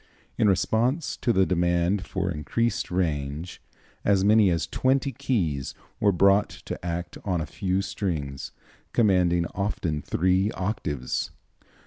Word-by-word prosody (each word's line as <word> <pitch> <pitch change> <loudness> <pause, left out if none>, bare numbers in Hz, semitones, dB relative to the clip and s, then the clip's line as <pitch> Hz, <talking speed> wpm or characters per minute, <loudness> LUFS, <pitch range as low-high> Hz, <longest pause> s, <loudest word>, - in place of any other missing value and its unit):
In 105 - +3
response 115 - +1
to 120 - +1
the 95 -3 +4
demand 90 +2 +1
for 95 -2 -2
increased 115 +9 -1
range, 80 -2 -2 0.4
as 100 -2 +3
many 105 -1 +5
as 85 -2 0
twenty 135 +1 +1
keys 85 - -1 0.2
were 105 - +4
brought 100 +3 +4 0.2
to - - -6
act 85 0 -4
on 90 -4 0
a 80 - -2
few 95 +4 -1
strings, 75 -11 -3 0.4
commanding 90 -6 +3
often 90 -6 -2
three 95 +6 +1
octaves. 75 - -2
95 Hz, 125 wpm, -26 LUFS, 85-105 Hz, 0.4 s, many